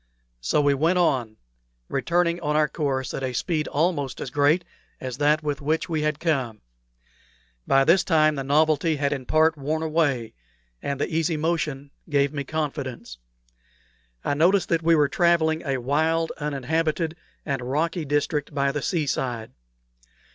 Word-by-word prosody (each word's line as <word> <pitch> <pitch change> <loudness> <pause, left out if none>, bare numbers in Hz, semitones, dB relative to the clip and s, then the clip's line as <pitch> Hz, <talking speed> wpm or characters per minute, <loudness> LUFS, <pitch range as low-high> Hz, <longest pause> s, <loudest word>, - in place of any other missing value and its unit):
So 60 - +1
we 145 -1 +3
went 160 +6 +2
on, 130 -11 +1 0.5
returning 170 +4 0
on 150 -2 -1
our 155 0 +3
course 135 -4 -2
at - - -4
a 130 -1 -2
speed 155 +4 -1
almost 145 -4 -1
as 130 - -5
great 145 +5 +2 0.3
as 130 -1 -5
that 150 +2 +2
with 145 -2 -2
which 155 +4 -1
we 160 -2 -1
had 150 -1 -1
come. 130 -10 -1 1.1
By 135 0 +5
this 170 +7 +4
time 155 -3 +3
the 135 -2 -3
novelty 155 +3 +2
had 145 0 0
in 130 -3 -6
part 160 0 +3
worn 155 +3 -2
away, 145 -8 0 0.5
and 140 -1 -3
the - - 0
easy 165 0 +1
motion 150 -3 -2 0.2
gave 140 -1 +2
me 140 -1 -3
confidence. 140 - -4 1.1
I - - +1
noticed 175 +6 +3
that 165 -1 +2
we 165 0 +4
were 150 -2 +4
travelling 165 -1 +2
a 135 -3 -1
wild, 160 +6 0
uninhabited, 155 +3 -1 0.3
and 135 -3 -2
rocky 155 +7 -1
district 145 +1 -1
by 140 -1 +2
the 150 0 -3
sea 165 -1 0
side. 120 -5 -3
150 Hz, 160 wpm, -24 LUFS, 140-160 Hz, 1.1 s, By